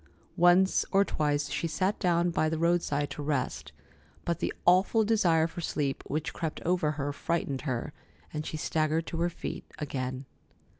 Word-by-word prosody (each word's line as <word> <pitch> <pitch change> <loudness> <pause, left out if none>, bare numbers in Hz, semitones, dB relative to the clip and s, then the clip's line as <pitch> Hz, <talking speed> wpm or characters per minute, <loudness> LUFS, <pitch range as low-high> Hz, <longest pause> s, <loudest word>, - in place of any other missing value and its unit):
Once 180 +1 +5
or 195 0 +4
twice 145 -3 0
she 165 - -1
sat 185 +5 0
down 175 -2 +2
by 155 -1 +1
the 160 - -1
roadside 165 -4 +1
to - - -5
rest, 140 -3 -2 0.5
but 170 -2 -1
the - - -1
awful 190 +5 +5
desire 175 -7 +3
for 165 +1 -5
sleep 140 -4 -1
which 155 +2 -2
crept 160 -2 -3
over 170 -3 +1
her 145 -1 -3
frightened 145 -3 -2
her, 125 +3 -3 0.4
and 155 0 -2
she 155 - -4
staggered 155 +1 0
to 165 - -5
her 175 - +2
feet 170 - -6
again. 130 -2 -4
160 Hz, 165 wpm, -29 LUFS, 145-175 Hz, 0.5 s, Once